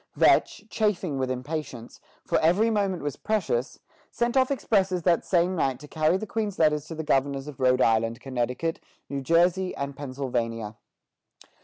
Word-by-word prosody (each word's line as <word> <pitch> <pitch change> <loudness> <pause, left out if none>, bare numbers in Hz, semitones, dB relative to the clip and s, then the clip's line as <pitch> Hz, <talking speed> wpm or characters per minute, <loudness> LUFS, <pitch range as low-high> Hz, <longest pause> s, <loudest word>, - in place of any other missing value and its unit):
Vetch, - - +3
chafing 190 -9 -1
with 130 -1 -1
impatience, 130 -2 -5 0.2
for - - +1
every 195 +8 +3
moment 195 -5 0
was 145 -1 -3
precious, 170 - -1 0.3
sent 240 +1 -1
off 260 -1 +4
expresses 195 -9 +1
that 170 -1 +3
same 180 0 +1
night 135 -6 0
to 150 - -11
carry 155 +4 +1
the 215 - -5
Queen's 210 -2 -3
letters 150 -2 +2
to 165 - -7
the 160 - -4
governors 135 -1 0
of 145 -3 -9
Rhode 130 0 +3
Island, 115 +1 +1
Connecticut, 130 +5 -2 0.3
New 140 -1 -3
Jersey, 175 +5 +2
and 140 0 -4
Pennsylvania. 120 -6 -3
155 Hz, 160 wpm, -26 LUFS, 130-185 Hz, 0.3 s, off